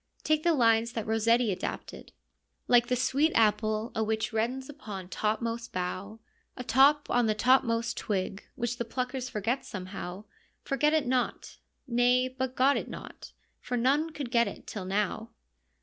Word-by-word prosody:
Take 310 Hz, 0 st, +2 dB
the 335 Hz, 0 st, +3 dB
lines 230 Hz, -2 st, +3 dB
that 225 Hz, -, -3 dB
Rossetti 225 Hz, +1 st, +2 dB
adapted: 185 Hz, -, -6 dB, 0.6 s
Like 240 Hz, -1 st, +5 dB
the 250 Hz, -, +1 dB
sweet 275 Hz, +5 st, +2 dB
apple 215 Hz, 0 st, +2 dB
a 220 Hz, -, 0 dB
which 220 Hz, +1 st, -1 dB
reddens 250 Hz, +4 st, -1 dB
upon 205 Hz, -10 st, -8 dB
topmost 230 Hz, +4 st, -2 dB
bough, 185 Hz, +4 st, -4 dB, 0.4 s
A 250 Hz, -, -5 dB
top 280 Hz, +4 st, +4 dB
on 245 Hz, -2 st, +3 dB
the 215 Hz, -, +1 dB
topmost 230 Hz, 0 st, +2 dB
twig— 195 Hz, -1 st, -2 dB
which 240 Hz, -2 st, -2 dB
the -, -, +1 dB
pluckers 255 Hz, +2 st, -3 dB
forget 230 Hz, +5 st, -1 dB
somehow, 185 Hz, 0 st, -7 dB, 0.4 s
Forget 300 Hz, +2 st, +1 dB
it 310 Hz, -3 st, +2 dB
not 250 Hz, 0 st, -2 dB
— -, -, -49 dB
nay, 245 Hz, +1 st, +3 dB
but 260 Hz, 0 st, -4 dB
got 275 Hz, +2 st, +4 dB
it -, -, -4 dB
not, -, -, -10 dB, 0.3 s
for 250 Hz, -, -3 dB
none 280 Hz, +7 st, +2 dB
could 285 Hz, -6 st, -6 dB
get 235 Hz, -1 st, +3 dB
it -, -, -8 dB
till 200 Hz, -4 st, -6 dB
now. 210 Hz, +3 st, -1 dB
235 Hz, 165 wpm, -29 LUFS, 215-260 Hz, 0.6 s, Like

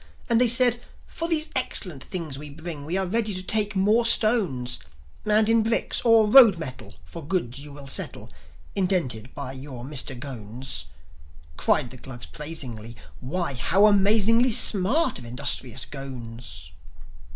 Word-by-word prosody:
And 230 Hz, +1 st, +4 dB
they 250 Hz, -, +4 dB
said, 240 Hz, 0 st, +3 dB, 0.2 s
"For 330 Hz, -, -3 dB
these 315 Hz, -2 st, 0 dB
excellent 180 Hz, -, +1 dB
things 165 Hz, -8 st, -5 dB
we 145 Hz, +2 st, -9 dB
bring 155 Hz, -1 st, -8 dB
We 170 Hz, +5 st, -2 dB
are 190 Hz, -, 0 dB
ready 215 Hz, +1 st, -1 dB
to 185 Hz, -, -4 dB
take 210 Hz, +1 st, 0 dB
more 210 Hz, +5 st, +2 dB
stones; 210 Hz, -, +3 dB, 0.5 s
And 215 Hz, 0 st, +3 dB
in 225 Hz, 0 st, +3 dB
bricks 225 Hz, +1 st, -1 dB
or 230 Hz, -2 st, +4 dB
road 225 Hz, -5 st, +7 dB
metal 130 Hz, -, -8 dB
For 160 Hz, -, -10 dB
goods 140 Hz, -6 st, -3 dB
you 145 Hz, +1 st, -10 dB
will 140 Hz, 0 st, -11 dB
settle 135 Hz, -, -4 dB, 0.4 s
Indented 165 Hz, -, -1 dB
by 140 Hz, -2 st, -6 dB
your 130 Hz, -2 st, -9 dB
Mister 135 Hz, -2 st, -5 dB
Ghones." 120 Hz, -, -3 dB, 0.7 s
Cried 120 Hz, -, +1 dB
the 130 Hz, -, -11 dB
Glugs 120 Hz, -1 st, -10 dB
praisingly, 125 Hz, -7 st, -7 dB, 0.2 s
"Why 165 Hz, -, -3 dB
how 165 Hz, -, +2 dB
amazingly 215 Hz, +4 st, +4 dB
Smart 230 Hz, -, +3 dB
of 120 Hz, -, -11 dB
industrious 120 Hz, 0 st, 0 dB
Ghones!" 125 Hz, -4 st, -9 dB
170 Hz, 150 wpm, -24 LUFS, 130-215 Hz, 0.7 s, road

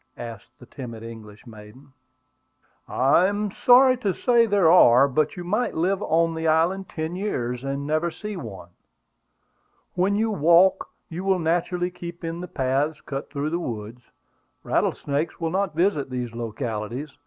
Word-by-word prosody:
asked 120 Hz, +2 st, -9 dB
the -, -, -14 dB
timid 115 Hz, -5 st, -9 dB
English 110 Hz, -2 st, -11 dB
maiden. 115 Hz, +4 st, -14 dB, 0.9 s
"I 140 Hz, +8 st, +3 dB
am 205 Hz, 0 st, -2 dB
sorry 255 Hz, +4 st, +5 dB
to 205 Hz, -6 st, -1 dB
say 235 Hz, -2 st, +3 dB
there 200 Hz, -6 st, +4 dB
are; 135 Hz, -6 st, +7 dB
but 150 Hz, +3 st, 0 dB
you 175 Hz, -, -5 dB
might 215 Hz, +8 st, -1 dB
live 185 Hz, +4 st, 0 dB
on 165 Hz, -1 st, +1 dB
the 160 Hz, 0 st, -2 dB
island 170 Hz, +4 st, +1 dB
ten 160 Hz, +2 st, -4 dB
years 125 Hz, -, -3 dB
and 140 Hz, +1 st, -3 dB
never 155 Hz, +3 st, 0 dB
see 210 Hz, +5 st, -7 dB
one. 100 Hz, -, -8 dB, 1.2 s
When 190 Hz, +3 st, +1 dB
you 220 Hz, +1 st, +1 dB
walk, 175 Hz, +1 st, +4 dB, 0.2 s
you 175 Hz, +1 st, -6 dB
will 195 Hz, -1 st, +2 dB
naturally 175 Hz, +2 st, -1 dB
keep 175 Hz, -1 st, -9 dB
in 165 Hz, +1 st, -4 dB
the 180 Hz, -, -6 dB
paths 140 Hz, +2 st, -1 dB
cut 135 Hz, -1 st, -6 dB
through 145 Hz, +1 st, -3 dB
the 170 Hz, -, -1 dB
woods. 115 Hz, -4 st, -6 dB, 0.6 s
Rattlesnakes 145 Hz, +3 st, -1 dB
will 165 Hz, -1 st, -2 dB
not 190 Hz, -3 st, -1 dB
visit 165 Hz, -6 st, +1 dB
these 125 Hz, -2 st, -4 dB
localities. 115 Hz, +3 st, -5 dB
160 Hz, 155 wpm, -24 LUFS, 130-180 Hz, 1.2 s, are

